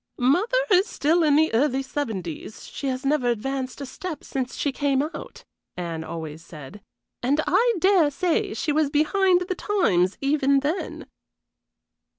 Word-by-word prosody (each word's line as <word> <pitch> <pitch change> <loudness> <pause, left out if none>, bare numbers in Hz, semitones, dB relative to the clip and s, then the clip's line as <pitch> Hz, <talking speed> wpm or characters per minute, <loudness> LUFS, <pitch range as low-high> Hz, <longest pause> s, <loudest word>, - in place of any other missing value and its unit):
"Mother 355 - +2
is 375 +2 +5
still 330 -3 +1
in 300 -3 +4
the 315 -2 +3
early 270 +2 +2
seventies; 215 - -5
she 280 - -6
has 260 +1 -3
never 275 -3 +1
advanced 260 +3 -3
a - - -4
step 310 +4 -7
since 260 -2 -4
she 285 - -1
came 275 0 +1
out," 310 - -8 0.3
Anne 165 -2 -4
always 160 -1 -7
said, 155 +6 -11 0.4
"and 275 +5 +1
I 475 0 +3
dare 370 -4 +4
say 345 +3 -1
she 305 - -1
was 300 -1 +2
behind 355 +5 +3
the 365 +1 -2
times 205 - +1
even 275 -1 +2
then." 305 +7 -3
280 Hz, 155 wpm, -24 LUFS, 245-325 Hz, 0.4 s, is